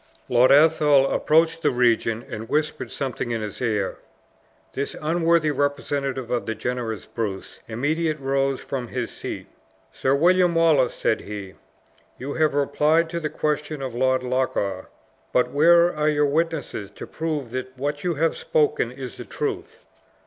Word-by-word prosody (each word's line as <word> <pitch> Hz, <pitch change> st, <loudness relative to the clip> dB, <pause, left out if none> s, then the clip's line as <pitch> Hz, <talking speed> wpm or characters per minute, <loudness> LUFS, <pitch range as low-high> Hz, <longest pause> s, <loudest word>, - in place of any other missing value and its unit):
Lord 125 Hz, +1 st, +5 dB
Athol 150 Hz, -2 st, +5 dB
approached 165 Hz, +1 st, +2 dB
the -, -, +3 dB
regent, 120 Hz, -2 st, +1 dB
and 110 Hz, 0 st, -7 dB
whispered 150 Hz, 0 st, -1 dB
something 130 Hz, -3 st, -3 dB
in 115 Hz, -2 st, -2 dB
his 105 Hz, +3 st, -7 dB
ear. 105 Hz, -5 st, -1 dB, 0.7 s
This 140 Hz, -, -3 dB
unworthy 165 Hz, 0 st, +2 dB
representative 140 Hz, -2 st, -2 dB
of 120 Hz, -1 st, -1 dB
the 110 Hz, -, -2 dB
generous 115 Hz, -1 st, -3 dB
Bruce, 105 Hz, -5 st, -5 dB
immediate 155 Hz, +7 st, -1 dB
rose 135 Hz, 0 st, 0 dB
from 130 Hz, -3 st, -4 dB
his -, -, -4 dB
seat. -, -, -6 dB, 0.5 s
"Sir 135 Hz, +1 st, +1 dB
William 175 Hz, +3 st, +4 dB
Wallace," 155 Hz, -7 st, +3 dB
said 110 Hz, -, 0 dB
he, 100 Hz, -2 st, -7 dB, 0.6 s
"you 140 Hz, +3 st, -5 dB
have 155 Hz, -2 st, +1 dB
replied 155 Hz, +3 st, +2 dB
to 170 Hz, -, -2 dB
the 155 Hz, -2 st, -3 dB
questions 150 Hz, -1 st, -2 dB
of 130 Hz, -3 st, -4 dB
Lord 130 Hz, +1 st, +1 dB
Loch 130 Hz, +1 st, -1 dB
awe, 95 Hz, -2 st, -2 dB, 0.5 s
but 125 Hz, -, +2 dB
where 170 Hz, +3 st, +5 dB
are 150 Hz, 0 st, +1 dB
your 150 Hz, -1 st, +2 dB
witnesses 150 Hz, -8 st, -1 dB
to -, -, -7 dB
prove 150 Hz, -6 st, -4 dB
that 130 Hz, +1 st, -5 dB
what 145 Hz, +2 st, -3 dB
you 175 Hz, -2 st, 0 dB
have 160 Hz, +3 st, +1 dB
spoken 150 Hz, -5 st, +1 dB
is 130 Hz, -1 st, -8 dB
the -, -, -8 dB
truth?" -, -, -5 dB
140 Hz, 155 wpm, -23 LUFS, 125-155 Hz, 0.7 s, Lord